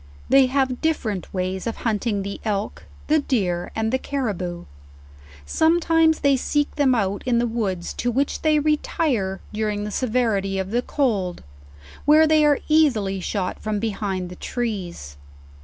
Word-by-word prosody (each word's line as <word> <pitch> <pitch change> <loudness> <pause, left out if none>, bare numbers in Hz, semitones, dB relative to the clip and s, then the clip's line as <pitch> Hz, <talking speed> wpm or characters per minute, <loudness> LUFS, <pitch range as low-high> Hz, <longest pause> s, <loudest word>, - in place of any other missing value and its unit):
They 265 0 +6
have 260 -1 0
different 225 - -1
ways 185 +1 -3
of 230 - -2
hunting 210 -2 0
the 200 0 -6
elk, 210 -1 -3 0.2
the 310 +1 +3
deer, 185 -11 -1
and 220 0 0
the 260 - +2
carriboo. 200 -12 -3 0.8
Sometimes 325 - +3
they 280 -2 +4
seek 290 +3 0
them 275 -4 +3
out 200 -3 -1
in 240 -2 +3
the 240 - +2
woods, 205 -7 -2
to 245 - 0
which 270 +4 -1
they 310 -1 +3
retire 290 -9 0
during 210 -1 -1
the 210 - -4
severity 220 -5 0
of 190 +1 -3
the 240 +2 +1
cold, 210 -11 -1 0.6
where 310 +2 +6
they 310 -1 +4
are 295 -1 +4
easily 245 -12 +2
shot 185 0 -3
from 215 -1 -2
behind 195 -4 -3
the 180 - -9
trees. 180 - -4
225 Hz, 155 wpm, -23 LUFS, 195-280 Hz, 0.8 s, They